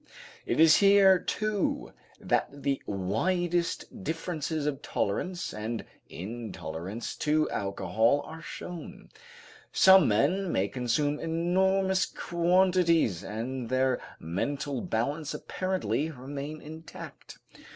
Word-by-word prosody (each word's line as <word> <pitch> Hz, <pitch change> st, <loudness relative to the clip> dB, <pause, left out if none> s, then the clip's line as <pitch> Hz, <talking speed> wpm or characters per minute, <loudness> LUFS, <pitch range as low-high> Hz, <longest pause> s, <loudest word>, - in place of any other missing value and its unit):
It -, -, 0 dB
is 160 Hz, -1 st, +8 dB
here, 195 Hz, -2 st, +6 dB
too, 210 Hz, +1 st, -2 dB, 0.3 s
that 140 Hz, 0 st, -1 dB
the 140 Hz, -1 st, 0 dB
widest 175 Hz, -, -1 dB
differences 160 Hz, -2 st, -3 dB
of 145 Hz, -1 st, -2 dB
tolerance 175 Hz, -, -2 dB
and 110 Hz, +2 st, -4 dB, 0.2 s
intolerance 100 Hz, -1 st, -6 dB
to 155 Hz, +1 st, +2 dB
alcohol 100 Hz, +7 st, +1 dB
are 160 Hz, +1 st, -9 dB
shown. 170 Hz, +3 st, -8 dB, 0.6 s
Some 190 Hz, -1 st, +7 dB
men 165 Hz, -, +2 dB
may 100 Hz, +2 st, +1 dB
consume 135 Hz, +6 st, 0 dB
enormous 190 Hz, +3 st, +1 dB
quantities 170 Hz, -, +2 dB
and 115 Hz, +4 st, -4 dB
their 130 Hz, 0 st, +1 dB, 0.2 s
mental 135 Hz, -, -2 dB
balance 140 Hz, +7 st, -2 dB
apparently 185 Hz, -4 st, -2 dB
remain 140 Hz, +2 st, -7 dB
intact. 160 Hz, +2 st, -10 dB
150 Hz, 100 wpm, -29 LUFS, 120-175 Hz, 0.6 s, is